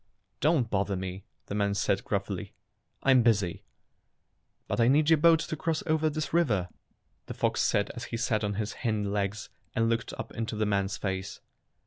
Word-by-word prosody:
"Don't 150 Hz, -5 st, +3 dB
bother 100 Hz, 0 st, 0 dB
me," 95 Hz, +1 st, -5 dB, 0.2 s
the -, -, -6 dB
man 100 Hz, -1 st, +1 dB
said -, -, +1 dB
gruffly. -, -, -3 dB, 0.5 s
"I'm 130 Hz, -2 st, +6 dB
busy." 105 Hz, -7 st, +2 dB, 1.1 s
"But -, -, -2 dB
I 115 Hz, -, +5 dB
need 150 Hz, +4 st, +4 dB
your 160 Hz, -, +7 dB
boat 165 Hz, 0 st, +6 dB
to 155 Hz, -, -3 dB
cross 160 Hz, +1 st, -1 dB
over 155 Hz, -1 st, +2 dB
this 155 Hz, +1 st, -4 dB
river," 110 Hz, -, +2 dB, 0.6 s
the -, -, -6 dB
fox -, -, +1 dB
said 100 Hz, -, +1 dB
as 120 Hz, 0 st, -7 dB
he 115 Hz, -, -4 dB
sat 115 Hz, -3 st, 0 dB
on 105 Hz, -1 st, -1 dB
his 105 Hz, +1 st, -2 dB
hind 105 Hz, -4 st, 0 dB
legs 100 Hz, 0 st, -2 dB, 0.3 s
and 115 Hz, 0 st, +2 dB
looked 115 Hz, 0 st, -1 dB
up -, -, -6 dB
into 115 Hz, 0 st, -4 dB
the 110 Hz, 0 st, 0 dB
man's 100 Hz, -1 st, 0 dB
face. 95 Hz, -1 st, -4 dB
110 Hz, 180 wpm, -29 LUFS, 100-140 Hz, 1.1 s, your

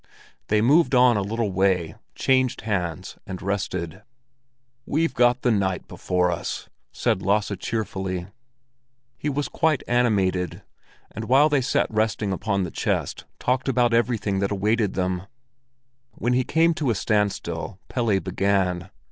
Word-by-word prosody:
They 105 Hz, 0 st, +2 dB
moved 145 Hz, +3 st, +4 dB
on 125 Hz, -1 st, +6 dB
a 105 Hz, -, +1 dB
little 110 Hz, +1 st, -2 dB
way, 95 Hz, -3 st, +1 dB, 0.2 s
changed 130 Hz, -2 st, +1 dB
hands, 90 Hz, -7 st, -3 dB
and 95 Hz, -1 st, -5 dB
rested. 95 Hz, -2 st, -3 dB, 0.9 s
"We've 165 Hz, +3 st, +1 dB
got 120 Hz, +1 st, +3 dB
the 125 Hz, -, +3 dB
night 95 Hz, -4 st, 0 dB
before 90 Hz, -1 st, 0 dB
us!" 85 Hz, -, -4 dB, 0.2 s
said 95 Hz, -, 0 dB
Lasse 105 Hz, +1 st, +1 dB
cheerfully. 95 Hz, -5 st, -3 dB, 0.9 s
He 150 Hz, -, -1 dB
was 145 Hz, +1 st, -1 dB
quite 155 Hz, -4 st, +1 dB
animated, 95 Hz, -8 st, +1 dB, 0.5 s
and 110 Hz, -, -6 dB
while 135 Hz, +6 st, +5 dB
they 145 Hz, -2 st, +2 dB
sat 130 Hz, -, +1 dB
resting 110 Hz, -1 st, 0 dB
upon 100 Hz, 0 st, -1 dB
the 90 Hz, -, -4 dB
chest -, -, -2 dB
talked 130 Hz, +2 st, 0 dB
about 120 Hz, -2 st, +2 dB
everything 115 Hz, -4 st, +1 dB
that 100 Hz, 0 st, 0 dB
awaited 105 Hz, +1 st, 0 dB
them. 90 Hz, 0 st, -2 dB, 0.9 s
When 120 Hz, +1 st, -1 dB
he 130 Hz, +1 st, +2 dB
came 165 Hz, +3 st, +3 dB
to 155 Hz, -5 st, -1 dB
a 115 Hz, -, +2 dB
standstill 100 Hz, -5 st, -1 dB
Pelle 115 Hz, -6 st, +1 dB
began. 95 Hz, 0 st, 0 dB
105 Hz, 140 wpm, -24 LUFS, 95-125 Hz, 0.9 s, on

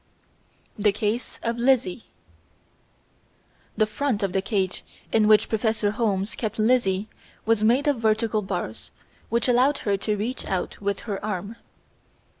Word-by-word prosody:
The 205 Hz, 0 st, +4 dB
Case 215 Hz, +3 st, -2 dB
of 230 Hz, 0 st, -1 dB
Lizzie 240 Hz, -5 st, +2 dB, 1.7 s
The 215 Hz, -, +4 dB
front 220 Hz, 0 st, -1 dB
of 195 Hz, -2 st, -1 dB
the 190 Hz, -, +1 dB
cage 190 Hz, -3 st, -1 dB, 0.3 s
in 220 Hz, -1 st, +4 dB
which 215 Hz, -1 st, +5 dB
Professor 220 Hz, -2 st, 0 dB
Holmes 205 Hz, -3 st, -1 dB
kept 220 Hz, -3 st, -4 dB
Lizzie 215 Hz, -3 st, +2 dB, 0.4 s
was 225 Hz, -1 st, +2 dB
made 250 Hz, +7 st, +3 dB
of 285 Hz, -5 st, +2 dB
vertical 220 Hz, -1 st, +1 dB
bars 180 Hz, -, -5 dB, 0.4 s
which 235 Hz, +1 st, +1 dB
allowed 255 Hz, +4 st, +4 dB
her 200 Hz, -2 st, +2 dB
to 210 Hz, +2 st, -1 dB
reach 235 Hz, +6 st, -3 dB
out 190 Hz, +1 st, -3 dB
with 200 Hz, -1 st, -1 dB
her 205 Hz, -3 st, -5 dB
arm. 210 Hz, +1 st, -4 dB
215 Hz, 140 wpm, -25 LUFS, 200-235 Hz, 1.7 s, which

